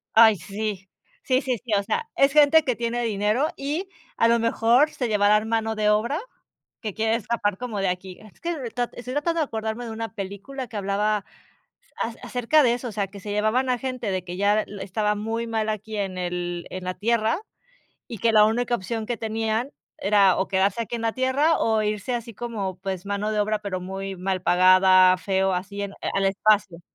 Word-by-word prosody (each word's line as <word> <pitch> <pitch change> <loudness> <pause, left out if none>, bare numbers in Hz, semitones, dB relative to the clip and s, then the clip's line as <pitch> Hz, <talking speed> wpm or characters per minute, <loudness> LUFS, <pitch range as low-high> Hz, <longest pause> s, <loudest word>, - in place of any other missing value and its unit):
Ay, 220 -1 +8
sí 200 +1 -5 0.3
sí 255 0 +2
sí 255 -3 -1
sí, 235 -3 -4
o 200 - 0
sea, 460 - -2
es 275 0 +4
gente 300 +2 +6
que 250 -5 -1
tiene 235 +1 -1
dinero, 215 +5 +1
y 305 +8 -3 0.3
a 230 - +3
lo 235 0 +4
mejor 230 +5 +3
se 250 -3 -3
llevarán 210 +1 +3
mano 225 -1 0
de 210 -1 +2
obra 235 - +1 0.6
que 215 -4 -4
quiere 225 0 +1
escapar 215 -3 -1
como 230 -4 -4
de 195 -1 +1
aquí. 180 0 -5
Es 215 -2 -17
que 340 - -2
estoy 245 +1 -4
tratando 330 +3 0
de - - +1
acordarme 220 -1 -4
de 230 - -6
una 225 0 -5
película 210 +6 -6
que 220 - -7
hablaba 205 +2 +1
a 200 - -9 0.8
a 230 - -3
acerca 250 +5 +2
de 240 -2 +4
eso, 245 0 -4
o - - -7
sea, 200 -1 -2
que 200 +1 -12
se 205 +2 -6
llevaban 215 +5 +1
a 250 - +2
gente 255 -4 -3
de 185 -1 -2
que 175 0 -6
ya 205 +2 +3 0.2
estaba 210 +2 -1
muy 225 +2 -3
mal 220 -1 -1
aquí 215 +1 -4
en 195 -2 -3
el 175 -1 -3
en 185 0 -6
la 185 0 -3
Tierra, 225 - +1 0.7
y 230 - -7
que 230 +3 +3
la 215 -1 +6
única 240 +2 0
opción 225 +1 -4
que 240 -1 -3
tenían 225 +3 -2 0.3
era, 195 -2 +4
o 190 - 0
quedarse 195 +3 +1
aquí 230 - -4
en 230 - -5
la 225 -1 0
Tierra 275 +5 +2
o 220 -1 +2
irse. 210 +4 -2
Así 235 -1 -6
como, 205 -5 -4
pues, 190 0 -4
mano 205 +1 -2
de 215 - 0
obra, 210 +1 +1
pero 200 -3 -4
muy 195 +1 -5
mal 185 0 -2
pagada, 185 +1 +6
feo, 190 0 0
así 200 +3 -4
en 200 - -5
a - - -15 0.2
al 195 - +2
espacio. 195 -2 +2
215 Hz, 210 wpm, -24 LUFS, 195-235 Hz, 0.8 s, Ay